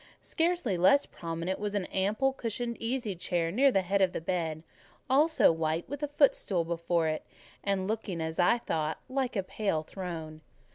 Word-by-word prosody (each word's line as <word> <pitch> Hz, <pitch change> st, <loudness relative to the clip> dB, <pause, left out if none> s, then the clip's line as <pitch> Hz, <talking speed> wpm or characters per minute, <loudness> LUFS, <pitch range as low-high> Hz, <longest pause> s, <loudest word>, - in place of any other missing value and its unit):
Scarcely 330 Hz, -, 0 dB
less 280 Hz, +11 st, +5 dB
prominent 170 Hz, +2 st, -4 dB
was 205 Hz, 0 st, -2 dB
an 200 Hz, -3 st, 0 dB
ample 210 Hz, +10 st, +1 dB
cushioned 235 Hz, -1 st, -3 dB
easy 230 Hz, -2 st, -2 dB
chair 170 Hz, -1 st, -1 dB
near 270 Hz, +8 st, +4 dB
the 195 Hz, -5 st, +2 dB
head 195 Hz, +2 st, +1 dB
of 185 Hz, -2 st, +3 dB
the -, -, -2 dB
bed, 165 Hz, -2 st, -2 dB, 0.4 s
also 300 Hz, -, +5 dB
white, 160 Hz, 0 st, -1 dB
with 285 Hz, +2 st, -6 dB
a 295 Hz, -, 0 dB
footstool 270 Hz, -, +2 dB
before 170 Hz, 0 st, 0 dB
it; 155 Hz, 0 st, -2 dB, 0.4 s
and 195 Hz, -1 st, 0 dB
looking, 210 Hz, -5 st, -3 dB
as 160 Hz, +1 st, -3 dB
I 180 Hz, +7 st, +5 dB
thought, 160 Hz, -8 st, -2 dB
like 260 Hz, -2 st, -1 dB
a 195 Hz, -, 0 dB
pale 190 Hz, -5 st, -1 dB
throne. 160 Hz, -3 st, -6 dB
190 Hz, 175 wpm, -30 LUFS, 165-240 Hz, 0.4 s, less